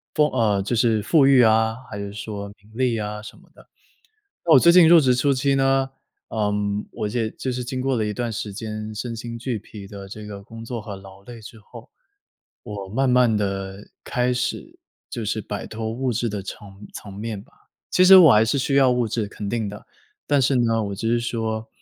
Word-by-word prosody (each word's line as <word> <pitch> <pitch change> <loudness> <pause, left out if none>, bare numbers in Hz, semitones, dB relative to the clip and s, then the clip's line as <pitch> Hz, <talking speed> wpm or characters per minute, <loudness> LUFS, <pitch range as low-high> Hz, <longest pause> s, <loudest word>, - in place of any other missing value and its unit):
风 150 -1 +4
呃， 105 -3 +1
就 120 - -1
是 115 -1 +2
富 145 +2 +4
裕 135 -2 +6
啊， 110 0 +3 0.2
还 105 - -5
是 100 0 -5
说 100 -1 -6
名 105 +3 -23
利 125 -1 0
啊 105 0 -4
什 - - -11
么 - - -21
的。 - - -19 0.8
那 165 - +1
我 135 - +9
最 170 +6 +6
近 175 -2 +7
入 170 - +8
职 130 -4 +3
初 140 +3 +2
期 135 +1 +1
呢， 135 0 +2 0.4
呃， 105 -2 -1 0.4
我 105 - -3
也 110 +1 -1
就 130 - -4
是 125 0 -3
经 130 +1 -4
过 135 0 0
了 110 - 0
一 105 - -2
段 120 +2 -3
时 105 -1 -5
间 110 0 -6
身 115 +2 -4
心 115 +1 -6
俱 120 -1 -3
疲 100 0 -11
的 100 -1 -10
这 105 +2 -9
个 100 -1 -9
工 115 +2 -10
作 115 -1 -5
和 105 -2 -7
劳 95 0 -14
累 120 +2 -11
之 110 +1 -12
后， 105 - -14 0.7
我 100 -2 -7
慢 130 +6 0
慢 125 -3 +4
地 95 0 -4
开 125 0 0
始 320 - -4 0.3
就 115 - -5
是 110 +1 -1
摆 105 0 -6
脱 110 0 -5
物 125 +2 -2
质 115 +2 -1
的 100 -1 -4
层 100 0 -10
层 100 - -9
面 105 +1 -5
吧。 - - -22 0.4
其 180 - +4
实 190 +1 +10
我 160 -7 +8
还 105 +1 +5
是 115 - 0
需 135 +2 -1
要 135 -2 +5
物 125 -2 +1
质， 110 -1 -2
肯 100 0 -7
定 115 -2 -2
的， 105 0 -10 0.4
但 145 -1 +3
是 130 +2 +2
呢， 115 -2 +2
我 100 -1 -4
只 115 +3 -3
是 120 0 +2
说 110 -2 -3
115 Hz, 240 characters per minute, -23 LUFS, 105-125 Hz, 0.8 s, 实